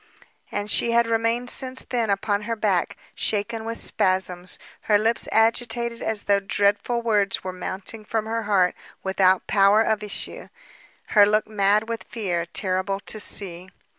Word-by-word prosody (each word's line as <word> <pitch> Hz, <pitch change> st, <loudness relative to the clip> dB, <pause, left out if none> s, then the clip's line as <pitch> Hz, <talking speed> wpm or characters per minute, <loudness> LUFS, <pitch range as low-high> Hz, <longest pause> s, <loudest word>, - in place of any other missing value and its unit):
And 205 Hz, 0 st, -3 dB
she 235 Hz, -, +2 dB
had 235 Hz, 0 st, +4 dB
remained 230 Hz, +2 st, 0 dB
since 260 Hz, -1 st, 0 dB
then 235 Hz, -4 st, -1 dB
upon 200 Hz, +1 st, 0 dB
her 230 Hz, -, 0 dB
back, 200 Hz, -5 st, 0 dB, 0.2 s
shaken 220 Hz, +2 st, -2 dB
with 230 Hz, 0 st, -4 dB
spasms, 185 Hz, -1 st, 0 dB, 0.3 s
her 210 Hz, -, +6 dB
lips 225 Hz, +2 st, +1 dB
agitated 235 Hz, +1 st, +1 dB
as 215 Hz, -2 st, -1 dB
though 200 Hz, -1 st, +3 dB
dreadful 205 Hz, +4 st, 0 dB
words 205 Hz, -4 st, +1 dB
were 185 Hz, -1 st, -4 dB
mounting 190 Hz, +4 st, -6 dB
from 220 Hz, +1 st, -2 dB
her 230 Hz, +1 st, -2 dB
heart 185 Hz, -3 st, +3 dB, 0.3 s
without 190 Hz, -1 st, +2 dB
power 200 Hz, +2 st, +4 dB
of 220 Hz, -1 st, 0 dB
issue, 210 Hz, -1 st, -6 dB, 0.6 s
her 205 Hz, -2 st, +6 dB
look 215 Hz, +1 st, +2 dB
mad 210 Hz, +1 st, +1 dB
with 230 Hz, -1 st, -4 dB
fear, 175 Hz, -7 st, -3 dB
terrible 190 Hz, +2 st, -1 dB
to 215 Hz, -, -4 dB
see. 185 Hz, -3 st, 0 dB
210 Hz, 155 wpm, -24 LUFS, 195-225 Hz, 0.6 s, her